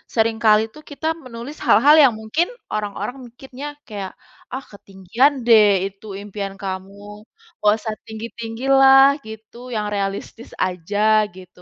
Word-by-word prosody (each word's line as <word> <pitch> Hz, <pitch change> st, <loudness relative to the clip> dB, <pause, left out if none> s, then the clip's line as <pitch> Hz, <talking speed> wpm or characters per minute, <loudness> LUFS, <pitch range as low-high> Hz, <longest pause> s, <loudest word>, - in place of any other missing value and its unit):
seringkali 220 Hz, -1 st, +3 dB
tuh 305 Hz, -, -13 dB
kita 300 Hz, +2 st, -4 dB, 0.2 s
menulis 250 Hz, +4 st, -9 dB
hal-hal 280 Hz, +9 st, +6 dB
yang 260 Hz, -4 st, +5 dB
mungkin 220 Hz, +11 st, 0 dB, 0.3 s
orang-orang 210 Hz, +3 st, -4 dB
mikirnya 265 Hz, +3 st, -10 dB, 0.2 s
kayak, 200 Hz, -4 st, -6 dB, 0.4 s
"Ah 260 Hz, -, -3 dB
ketinggian 200 Hz, +7 st, 0 dB
deh 220 Hz, -3 st, +7 dB, 0.2 s
itu 195 Hz, +2 st, -20 dB, 0.2 s
impian 200 Hz, -1 st, -6 dB
kamu, 195 Hz, +1 st, -6 dB, 0.6 s
gak 210 Hz, 0 st, +4 dB
usah 220 Hz, -1 st, -4 dB
tinggi-tinggi 225 Hz, +1 st, -7 dB, 0.2 s
lah," 270 Hz, 0 st, +8 dB, 0.2 s
gitu, 220 Hz, +1 st, -11 dB, 0.2 s
"yang 210 Hz, -1 st, -2 dB
realistis 200 Hz, +3 st, -4 dB, 0.2 s
aja," 205 Hz, +4 st, +1 dB
gitu. 185 Hz, -1 st, -15 dB
220 Hz, 130 wpm, -20 LUFS, 200-240 Hz, 0.6 s, lah